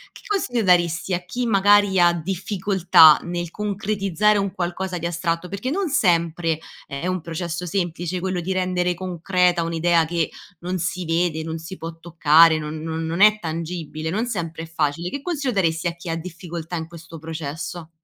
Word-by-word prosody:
che -, -, -12 dB
consiglio 255 Hz, -, 0 dB
daresti 175 Hz, -1 st, +2 dB
a 175 Hz, 0 st, -6 dB
chi, 240 Hz, +7 st, -3 dB
magari, 205 Hz, -2 st, +4 dB
ha 175 Hz, 0 st, +5 dB
difficoltà 185 Hz, -2 st, +4 dB
nel 175 Hz, -1 st, -4 dB
concretizzare 205 Hz, 0 st, 0 dB
un 200 Hz, -1 st, -1 dB
qualcosa 180 Hz, +1 st, -3 dB
di 170 Hz, -, -5 dB
astratto? 170 Hz, +1 st, -2 dB
Perché 200 Hz, +7 st, -3 dB
non 375 Hz, +2 st, -1 dB
sempre 170 Hz, -, +1 dB, 0.3 s
è 140 Hz, +6 st, -4 dB
un 185 Hz, 0 st, -1 dB
processo 170 Hz, +1 st, -4 dB
semplice 175 Hz, 0 st, -2 dB
quello 185 Hz, -1 st, -1 dB
di 180 Hz, +2 st, -2 dB
rendere 180 Hz, -1 st, 0 dB
concreta 180 Hz, 0 st, +1 dB
un'idea 165 Hz, 0 st, +2 dB
che 165 Hz, 0 st, -1 dB, 0.3 s
non 180 Hz, +2 st, -3 dB
si 180 Hz, +2 st, -2 dB
vede, 165 Hz, -1 st, 0 dB
non 160 Hz, 0 st, -4 dB
si 165 Hz, +4 st, -9 dB
può 165 Hz, 0 st, -7 dB
toccare, 165 Hz, -1 st, +5 dB
non 150 Hz, 0 st, -5 dB
non 160 Hz, 0 st, -3 dB
non 165 Hz, +3 st, -2 dB
è 215 Hz, 0 st, +7 dB
tangibile, 160 Hz, -2 st, -4 dB
non 215 Hz, +7 st, -1 dB
sempre 165 Hz, -7 st, -4 dB
è -, -, -6 dB
facile. 165 Hz, +1 st, -2 dB
Che 280 Hz, -, -5 dB
consiglio 290 Hz, -6 st, -2 dB
daresti 165 Hz, -3 st, +1 dB
a 170 Hz, -, -3 dB
chi 170 Hz, 0 st, -9 dB
ha 165 Hz, -, -1 dB
difficoltà 170 Hz, 0 st, -7 dB
in 160 Hz, 0 st, -5 dB
questo 165 Hz, -1 st, -11 dB
processo? 160 Hz, +1 st, -6 dB
175 Hz, 175 wpm, -22 LUFS, 165-190 Hz, 0.3 s, è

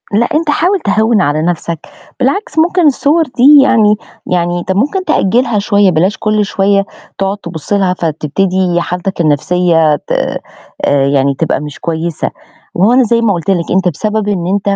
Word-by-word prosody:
لأ 230 Hz, +4 st, +2 dB
أنت 310 Hz, +1 st, 0 dB
حاول 360 Hz, +6 st, +1 dB
تهوِّن 220 Hz, -, +1 dB
على 150 Hz, -1 st, 0 dB
نَفسك، 170 Hz, -1 st, -2 dB, 0.4 s
بالعكس 285 Hz, +9 st, -1 dB
ممكن 350 Hz, +1 st, +2 dB
الصور 295 Hz, +3 st, +2 dB
دي 280 Hz, +1 st, +5 dB
يعني 215 Hz, -6 st, +3 dB, 0.3 s
يعني 175 Hz, -1 st, -1 dB
أنت 180 Hz, -, -4 dB
ممكن 290 Hz, -, -1 dB
تأجلها 235 Hz, -4 st, +1 dB
شوية 200 Hz, -1 st, +2 dB
بلاش 180 Hz, +6 st, +1 dB
كُل 215 Hz, -1 st, 0 dB
شوية 200 Hz, 0 st, +1 dB, 0.3 s
تقعد 195 Hz, +1 st, -2 dB
تبُص 170 Hz, -1 st, -6 dB
لها 190 Hz, -3 st, +1 dB
فتبتدي 175 Hz, +3 st, -1 dB
حالتك 180 Hz, +1 st, -3 dB
النفسية 165 Hz, 0 st, +2 dB
ت -, -, -10 dB
آآ 140 Hz, -1 st, -2 dB
يعني 140 Hz, 0 st, +1 dB
تبقى 160 Hz, -4 st, 0 dB
مش 150 Hz, -2 st, -8 dB
كويسة 165 Hz, -1 st, -3 dB, 0.4 s
وأهو 200 Hz, +7 st, +3 dB
أنا 255 Hz, +1 st, +4 dB
زي 230 Hz, 0 st, +1 dB
ما 220 Hz, -3 st, +2 dB
قُلت 170 Hz, 0 st, -4 dB
لك 175 Hz, -3 st, 0 dB
أنت 185 Hz, 0 st, +1 dB
بسبب 210 Hz, +5 st, -2 dB
إن 185 Hz, -4 st, -2 dB
أنت 200 Hz, +1 st, 0 dB
195 Hz, 165 wpm, -12 LUFS, 170-230 Hz, 0.4 s, دي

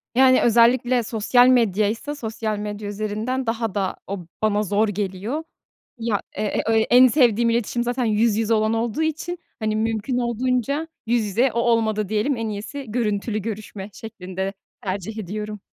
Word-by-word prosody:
Yani, 255 Hz, 0 st, +6 dB
özellikle 240 Hz, +1 st, +4 dB
sosyal 230 Hz, +3 st, +3 dB
medyaysa 230 Hz, +2 st, +2 dB
sosyal 220 Hz, -4 st, -3 dB
medya 205 Hz, 0 st, -5 dB
üzerinden 215 Hz, +5 st, -2 dB
daha 225 Hz, -2 st, -2 dB
da 195 Hz, -2 st, -1 dB
o 200 Hz, 0 st, -4 dB, 0.2 s
bana 210 Hz, -1 st, +2 dB
zor 210 Hz, +2 st, +1 dB
geliyor. 205 Hz, -, -3 dB, 0.6 s
Ya, 225 Hz, -3 st, 0 dB
e 210 Hz, -, -4 dB
e 220 Hz, +1 st, +1 dB
en 250 Hz, +1 st, +8 dB
sevdiğim 235 Hz, -3 st, +3 dB
iletişim 235 Hz, +1 st, 0 dB
zaten 245 Hz, +1 st, -1 dB
yüz 220 Hz, 0 st, +2 dB
yüze 225 Hz, 0 st, +2 dB
olan 215 Hz, 0 st, +2 dB
olduğu 235 Hz, +6 st, -1 dB
için, 320 Hz, +3 st, -2 dB, 0.2 s
hani, 215 Hz, -1 st, -1 dB
mümkün 225 Hz, +3 st, -1 dB
olduğunca 250 Hz, +5 st, 0 dB, 0.2 s
yüz 230 Hz, -1 st, +2 dB
yüze, 235 Hz, +6 st, +2 dB
o 235 Hz, -, -2 dB
olmadı 220 Hz, -3 st, +1 dB
diyelim: 220 Hz, +6 st, 0 dB
"En 225 Hz, -1 st, -3 dB
iyisi 215 Hz, +7 st, -5 dB
görüntülü 215 Hz, -1 st, -1 dB
görüşme." 210 Hz, -1 st, -6 dB
şeklinde 190 Hz, -3 st, -5 dB, 0.3 s
tercih 195 Hz, +3 st, -4 dB
ediyorum. 210 Hz, +1 st, -5 dB
220 Hz, 150 wpm, -23 LUFS, 210-240 Hz, 0.6 s, en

